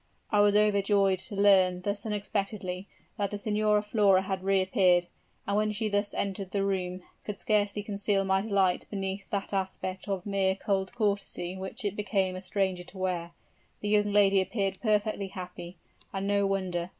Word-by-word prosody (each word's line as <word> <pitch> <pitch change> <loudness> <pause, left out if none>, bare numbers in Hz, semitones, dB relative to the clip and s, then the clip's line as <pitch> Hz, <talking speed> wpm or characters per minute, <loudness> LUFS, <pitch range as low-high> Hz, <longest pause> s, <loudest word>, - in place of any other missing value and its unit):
I 210 - +3
was 205 0 +4
overjoyed 200 -2 +3
to 205 - -1
learn 190 -3 +4
thus 200 +3 -2
unexpectedly, 200 -2 -3 0.3
that 200 -1 0
the 205 - -4
Signora 210 0 +1
Flora 205 -3 +3
had 190 -1 -3
reappeared; 185 -2 +3 0.4
and 200 - -1
when 215 0 +2
she 210 0 -2 0.2
entered 195 -1 -2
the 200 0 -1
room, 185 -2 -2 0.2
could 210 -1 -6
scarcely 205 -1 +1
conceal 200 -1 0
my 190 0 +2
delight 195 -4 +1
beneath 195 -1 -4
that 200 0 -3
aspect 190 0 -3
of 195 -2 -2
mere 195 -2 +1
cold 195 -1 -1
courtesy 200 -5 -1
which 190 +2 -5
it 205 -1 -1
became 195 -3 0
a 185 - -6
stranger 190 -2 -1
to 185 - -12
wear. 180 -2 -2 0.5
The 205 - -2
young 205 0 +3
lady 200 -1 +5
appeared 195 -1 -2
perfectly 210 -2 +1
happy, 180 -1 -8 0.3
and 195 0 -3
no 200 0 +2
wonder! 185 -3 -2
195 Hz, 165 wpm, -29 LUFS, 190-205 Hz, 0.5 s, lady